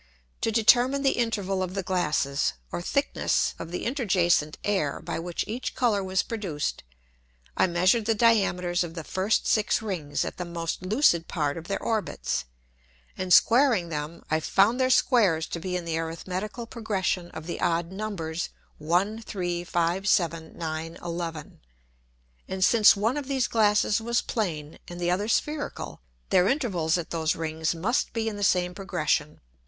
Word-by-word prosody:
To - - +1
determine 245 +5 +4
the 270 - +4
interval 200 -5 -1
of 185 0 -3
the 195 - -2
Glasses, 150 -6 0 0.2
or - - -3
thickness 280 +10 0
of 165 - -6
the 180 - -4
interjacent 185 - +1
Air, 190 -9 0
by - - -4
which 170 +1 -3
each 235 +4 -4
Colour 220 -6 +2
was 190 0 0
produced, 185 -10 -3 0.7
I - - +3
measured 185 +6 +2
the 225 0 +2
Diameters 190 -6 +2
of 165 -1 -7
the 165 - -5
first 190 +7 0
six 215 -2 +2
Rings 180 -9 -3
at - - -6
the 180 - -3
most 170 -1 -4
lucid 185 - +2
part 150 -4 -1
of 165 0 -8
their 195 - -1
Orbits, 220 - -2 0.7
and 185 -1 -4
squaring 230 -4 +5
them, 155 +1 -5
I 155 - +3
found 200 +9 +3
their 255 0 +3
Squares 200 -11 +3
to 170 - -4
be 180 +2 -3
in 175 - -6
the 165 -1 -1
arithmetical 185 +7 -4
Progression 195 -6 -2
of 160 - -9
the 175 - -5
odd 170 +1 0
Numbers, 190 -5 -4 0.3
1, 180 +8 0
3, 175 -5 -3
5, 175 +3 0
7, 165 -5 +1
9, 160 0 -4
11. 170 -3 -5 0.9
And 190 0 +1
since 225 -3 +6
one 225 +7 0
of 285 -3 -4
these 265 -3 +1
Glasses 210 -1 +2
was 235 +1 0
plane, 160 -10 -3
and 175 0 -8
the 175 0 +1
other 200 +4 0
spherical, 295 - -2 0.3
their 180 0 +5
Intervals 190 - +1
at 170 - -5
those 160 -2 0
Rings 160 0 -2
must 210 +10 0
be 225 -1 -1
in 220 - -2
the 205 - -4
same 180 -2 +2
Progression. 175 -6 -1
185 Hz, 165 wpm, -26 LUFS, 165-220 Hz, 0.9 s, since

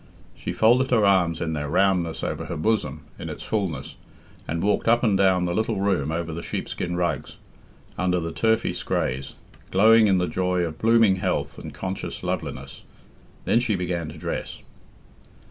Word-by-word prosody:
She - - -5
folded 125 +4 +3
her 110 -4 +3
arms 90 -4 +3
in 80 -1 -1
their 75 -1 -3
roundness 90 -1 +1
over - - -3
her - - -5
bosom 80 -6 -1 0.2
in - - -5
its - - -7
fulness 95 -11 -3 0.5
and 80 +2 -2
walked 105 +2 +1
up 120 +1 +4
and 105 -4 +3
down 95 -2 +3
the 85 - -1
little 110 0 0
room 95 -7 0
over 80 0 -3
the 85 - -5
sheep - - -4
skin 90 0 -3
rugs, 85 -1 -2 0.6
under 90 -1 +1
the 85 -1 -4
turfy 110 +5 +1
scraas, 65 +2 -2 0.3
glowing 110 +3 +6
in 95 -2 +3
the 90 - +1
joy 90 +2 0
of 80 -2 -4
blooming 115 -4 +4
health 70 -7 -2
and - - -9
conscious 95 0 -5
loveliness. 70 +1 -4 0.6
Then 115 - +3
she 120 -4 0
began 90 -3 -2
to 80 - -10
dress. - - -5
90 Hz, 175 wpm, -24 LUFS, 80-105 Hz, 0.6 s, glowing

